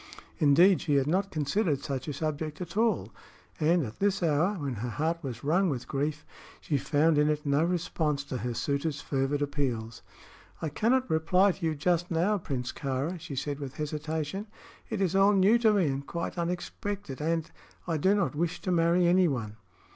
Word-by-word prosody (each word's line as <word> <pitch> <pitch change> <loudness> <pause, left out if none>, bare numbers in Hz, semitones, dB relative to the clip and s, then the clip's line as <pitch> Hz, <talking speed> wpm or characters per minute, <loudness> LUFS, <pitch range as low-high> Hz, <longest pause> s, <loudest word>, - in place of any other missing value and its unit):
Indeed, 170 +6 +5
she 150 -4 +1
had 135 -1 +3
not 185 +6 +1
considered 150 -1 0
such 135 -2 -4
a 150 - -2
subject 155 +1 -3
at 175 0 -7
all, 225 +1 +1 0.5
and 165 +2 +3
at 110 - -9
this 195 -2 +1
hour, 165 +5 +2
when 140 -7 -3
her 120 +2 -4
heart 160 +7 -1
was 125 -6 -6
wrung 175 +6 +2
with 130 -4 -4
grief, 150 +2 -2 0.3
she 150 - -2
found 150 +2 +2
in 150 0 +3
it 150 0 -1
no 140 +2 +2
response 160 -4 -1
to 135 -2 -5
her 120 0 -3
suitor's 140 +3 -1
fervid 140 +1 -1
appeals. 120 -7 -3 0.6
"I 160 - -2
cannot 250 - +1
reply 180 +5 +3
to 185 - -10
you 160 - -1
just 175 +3 0
now, 180 +5 +1
Prince 130 -7 -3
Kāra," 140 +6 -3
she 145 - -7
said, 140 +2 -3
with 135 -2 -6
hesitation; 155 +5 -3 0.4
"it 220 -3 -2
is 190 -1 +1
all 195 +1 +5
new 200 +4 +5
to 225 -2 +4
me, 200 -4 +3
and 140 -1 -1
quite 170 0 -4
unexpected, 175 -2 -4
and 160 +2 +1
and - - -21 0.4
I 165 -2 0
do 190 +7 +3
not 195 -5 0
wish 165 +3 -1
to 185 - -2
marry 170 +1 +3
anyone." 140 - +2
155 Hz, 190 wpm, -29 LUFS, 140-180 Hz, 0.6 s, Indeed